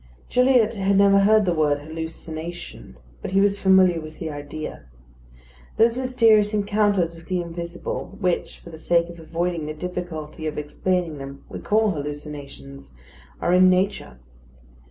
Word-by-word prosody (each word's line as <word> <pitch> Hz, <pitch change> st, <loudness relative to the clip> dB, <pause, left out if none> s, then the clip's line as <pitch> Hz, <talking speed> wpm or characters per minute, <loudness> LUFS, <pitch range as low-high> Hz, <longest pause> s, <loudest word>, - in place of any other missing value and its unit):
Gilliatt 250 Hz, -3 st, +4 dB
had 195 Hz, -2 st, +1 dB
never 200 Hz, 0 st, +6 dB
heard 210 Hz, +1 st, +4 dB
the 175 Hz, -, +1 dB
word 150 Hz, -3 st, +1 dB
"hallucination," 160 Hz, -, -7 dB, 0.2 s
but -, -, -5 dB
he 195 Hz, -, +4 dB
was 200 Hz, 0 st, +2 dB
familiar 185 Hz, -3 st, +4 dB
with 155 Hz, 0 st, -10 dB
the 160 Hz, -, -5 dB
idea. 145 Hz, -, -7 dB, 0.9 s
Those 230 Hz, +1 st, +4 dB
mysterious 225 Hz, -5 st, +3 dB
encounters 205 Hz, -4 st, +1 dB
with 165 Hz, 0 st, -14 dB
the 185 Hz, -1 st, -1 dB
invisible, 170 Hz, +2 st, -6 dB
which, 180 Hz, -4 st, -1 dB
for 170 Hz, -, -12 dB
the 160 Hz, -, -10 dB
sake 170 Hz, +1 st, +1 dB
of 170 Hz, 0 st, -11 dB
avoiding 165 Hz, 0 st, -3 dB
the 155 Hz, -, -5 dB
difficulty 160 Hz, -3 st, -5 dB
of 155 Hz, -, -4 dB
explaining 165 Hz, +1 st, -2 dB
them, 140 Hz, 0 st, -9 dB
we -, -, -7 dB
call 215 Hz, 0 st, +2 dB
hallucinations, 145 Hz, -, -7 dB, 0.5 s
are 175 Hz, -, +1 dB
in 185 Hz, 0 st, +6 dB
nature. 185 Hz, -, 0 dB
175 Hz, 150 wpm, -23 LUFS, 155-200 Hz, 0.9 s, never